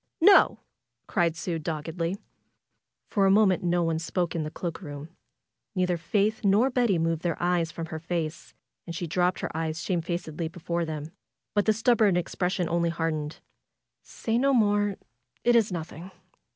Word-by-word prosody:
"No!" 390 +3 +7 0.5
cried 170 -2 +1
Sue 170 0 -3
doggedly. 165 +3 -3 0.9
For 195 -3 +2
a - - +4
moment 195 -2 +4
no 175 0 +1
one 165 -1 0
spoke 170 +1 -1
in 165 - -1
the 155 - -3
cloak 170 +2 -5
room. 145 -2 -8 0.7
Neither 180 -1 +1
Faith 205 +6 0
nor 210 +7 +4
Betty 240 -7 +2
moved 165 -1 0
their 170 -2 -2
eyes 175 -2 +1
from 165 - -5
her 160 - -3
face, 165 -1 -4 0.3
and 170 - -5
she 175 - -3
dropped 180 +2 0
her - - -4
eyes 160 0 -2
shamefacedly 170 -2 -2
before 170 0 -3
them; 155 0 -5 0.4
but 205 0 +1
the 215 - +5
stubborn 220 -4 +3
expression 180 0 -1
only 170 0 +1
hardened. 160 -2 -3 0.6
"Say 225 +1 -2
no 275 +1 +3
more! 205 -3 +2 0.5
It 240 0 +4
is 220 -3 +4
nothing." 170 +1 -6
175 Hz, 160 wpm, -27 LUFS, 165-200 Hz, 0.9 s, No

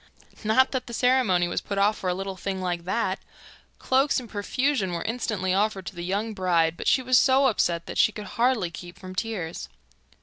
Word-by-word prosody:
Not 220 +5 +3
that 260 -2 -3
the 235 - -5
ceremony 245 -9 +3
was - - -2
put 200 - -5
off 205 +2 +3
for 185 - -2
a 180 - 0
little 195 0 -4
thing 190 +1 -4
like 175 -2 -3
that! 190 -1 -1 0.6
Cloaks 265 +2 +2
in 245 - -9
profusion 220 -1 -1
were 170 - -3
instantly 215 -5 -1
offered 195 -1 0
to 190 - -7
the 175 - -6
young 205 +5 -2
bride, 170 -4 +1
but - - -6
she 260 - +3
was 255 0 +5
so 270 +1 +4
upset 170 -8 +1
that - - -5
she - - +5
could 210 -1 -8
hardly 230 -7 +1
keep 175 +1 -10
from 185 0 -9
tears. 185 -5 -4
200 Hz, 205 wpm, -26 LUFS, 180-240 Hz, 0.6 s, was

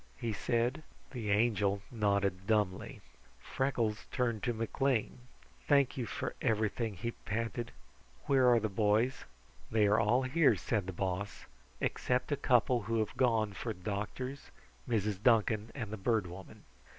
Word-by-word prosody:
he 115 -2 -2
said. 120 +7 0 0.3
The 115 -6 -4
Angel 100 -2 +2
nodded 100 -4 0
dumbly. 105 -4 0 0.4
Freckles 120 -5 -1
turned 120 -5 0
to 125 - 0
McLean. 115 +2 -1 0.5
"Thank 140 -3 +4
you 125 -4 -3
for - - -4
everything," 110 0 0
he 115 +7 -3
panted. 115 +2 -4 0.5
"Where 130 -2 +4
are 120 -1 +6
the 110 - -1
boys?" 110 +5 +1 0.4
"They 110 -1 +3
are 105 +1 +4
all 120 +4 +3
here," 145 +4 +4
said 105 -5 -2
the - - -2
Boss, 95 +2 -3 0.3
"except 125 +2 -1
a - - +3
couple 125 -3 +3
who 115 - +1
have 110 -2 -1
gone 110 -5 +2
for 115 +4 -4
doctors, 105 +8 -5 0.4
Mrs. 105 -4 0
Duncan 110 -1 +3
and 115 -6 -5
the - - -3
Bird 110 0 +1
Woman." 90 +2 -11
110 Hz, 145 wpm, -33 LUFS, 105-125 Hz, 0.5 s, are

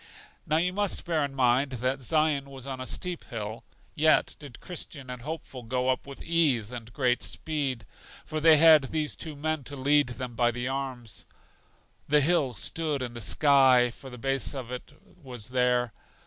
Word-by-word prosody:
Now 155 - +2
you 180 +2 +1
must 205 0 -1
bear 165 -4 +1
in 140 -1 -4
mind 130 +1 +2
that 130 +2 -1
Zion 150 0 +1
was 135 -2 -9
on 130 -2 -5
a 130 - -5
steep 180 -2 -3
hill, 110 -2 -6 0.3
yet 155 +1 +3
did 140 -6 -11
Christian 145 -7 -7
and 125 -1 -7
Hopeful 145 -2 -6
go 125 +2 -1
up 130 - -1
with 140 - -9
ease 145 -10 +2
and 115 -2 -8
great 125 +1 +1
speed, 140 -8 -2 0.4
for 155 - -3
they 160 0 +7
had 155 -2 +7
these 150 +2 -2
two 160 -2 -6
men 155 0 -2
to 145 - -8
lead 145 +2 +3
them 125 0 -6
by 120 +1 +2
the 120 +1 -3
arms. 130 -5 -4 0.8
The 150 0 +5
hill 145 -5 +1
stood 155 -5 -1
in 120 -1 -5
the 120 - -7
sky, 130 - +5
for 135 +3 -12
the 125 - -9
base 135 +3 -1
of 125 -3 -6
it 125 - -7 0.3
was 125 -6 -6
there. 125 -2 +1
135 Hz, 185 wpm, -28 LUFS, 125-150 Hz, 0.8 s, they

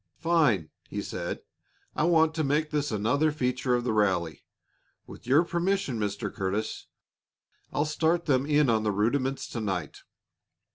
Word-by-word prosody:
"Fine!" 150 - +2 0.2
he - - -4
said. - - -4 0.5
"I 150 - +1
want 160 -2 +4
to 160 -1 -1
make 150 +2 0
this 150 -2 -1
another 125 +9 +1
feature 125 -3 0
of 120 - -1
the 120 - 0
rally. 90 -7 0 0.6
With - - -13
your 140 +6 +5
permission, 175 - -1
Mr. 100 -1 -3
Curtis, 100 +3 -3 0.8
I'll 145 - 0
start 160 +3 +1
them 135 -2 +2
in 150 -1 +3
on 110 -2 +3
the 105 -1 0
rudiments 130 +7 0
to 115 - -4
night. 95 -7 -3
130 Hz, 150 wpm, -28 LUFS, 105-155 Hz, 0.8 s, your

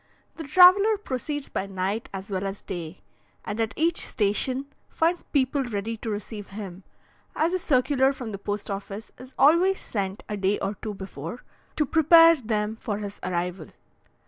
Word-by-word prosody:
The 325 - -6
traveller 370 +7 +7
proceeds 290 - -4
by 195 - -3
night 195 +4 -3
as 195 +2 -7
well 190 0 -1
as 195 +1 -7
day, 170 -1 -6 0.4
and 210 - -4
at 225 -1 0
each 335 +2 +1
station 245 +6 0 0.2
finds 335 +2 +1
people 275 0 +1
ready 225 -2 -3
to 225 - -5
receive 205 0 -5
him, 195 -2 -8 0.5
as 330 +3 +1
a 370 - +1
circular 265 -2 +2
from 250 -5 -6
the 195 - -6
post 205 +1 -4
office 200 +2 -6
is 255 +1 -13
always 340 +7 +5
sent 195 -2 -4
a 210 - -3
day 195 +1 +1
or 195 - -2
two 210 +1 -6
before, 190 - -7 0.3
to 305 - +2
prepare 330 +2 +7
them 215 -3 -2
for 220 -2 -4
his 205 -1 -7
arrival. 180 -2 -3
220 Hz, 170 wpm, -26 LUFS, 195-285 Hz, 0.5 s, traveller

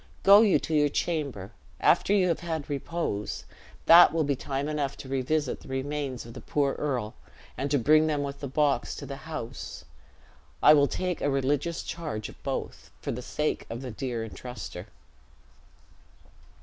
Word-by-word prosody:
Go 200 +2 +9
you 210 -4 +5
to 160 - -4
your 150 -1 +4
chamber. 140 - -2 0.3
After - - +3
you 195 -3 +4
have 165 - 0
had 160 -4 -4
repose, 140 - -3 0.4
that 170 +1 +9
will 165 -1 +1
be 140 -1 0
time 135 +2 -3
enough 145 -2 -2
to - - -9
revisit 135 +2 -1
the - - -15
remains 135 -1 -3
of 115 - -10
the - - -9
poor 140 -2 0
earl, 125 -7 -2 0.4
and 140 +2 -2
to 145 - +3
bring 155 +5 +4
them 150 -2 0
with 140 0 -5
the 140 - -4
box 145 +1 +1
to - - -7
the 140 - -6
house. 120 -7 -6 0.8
I 150 - +9
will 145 -1 +5
take 180 +1 -2
a 145 - +1
religious 140 +4 0
charge 150 -11 -5
of - - -15
both, - - -5
for - - -4
the 125 - -4
sake 150 +4 -2
of 115 +3 -6
the 125 - -5
dear 120 -1 -3
intruster." 115 -6 -8
145 Hz, 175 wpm, -28 LUFS, 130-155 Hz, 0.8 s, Go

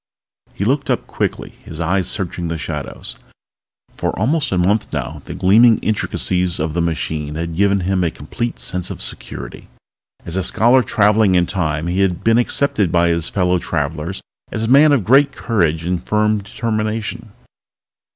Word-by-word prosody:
He 100 - -2
looked 140 +4 0
up - - 0
quickly, - - -4
his 80 - -9
eyes 90 +2 0
searching 90 -3 -3
the 85 0 -3
shadows. 75 -3 -6 0.8
For - - -2
almost 140 +9 +1
a 95 - +1
month 100 +5 +1
now - - -4
the - - -7
gleaming 110 +5 +5
intricacies 90 -4 0
of 80 0 -2
the 85 - 0
machine 80 -2 -2
had 85 0 -4
given 100 +1 +2
him 95 0 0
a 85 - +2
complete 115 +11 -5
sense 90 0 -2
of - - -6
security. - - -6 0.6
As 85 - -5
a 95 - 0
scholar 120 +7 +4
traveling 105 -2 +3
in 90 -1 +4
Time 80 -4 -2
he 90 +2 -1
had 95 -2 +1
been 115 +2 +4
accepted 115 - +1
by 85 0 +3
his 85 -1 +1
fellow 90 -2 +1
travelers 80 +3 -3 0.3
as 110 - -3
a - - -1
man 140 +5 +6
of 135 -7 +3
great 135 +7 +5
courage 85 -8 0
and 90 0 -1
firm 105 0 +1
determination. 110 +1 -3
95 Hz, 170 wpm, -18 LUFS, 85-110 Hz, 0.8 s, man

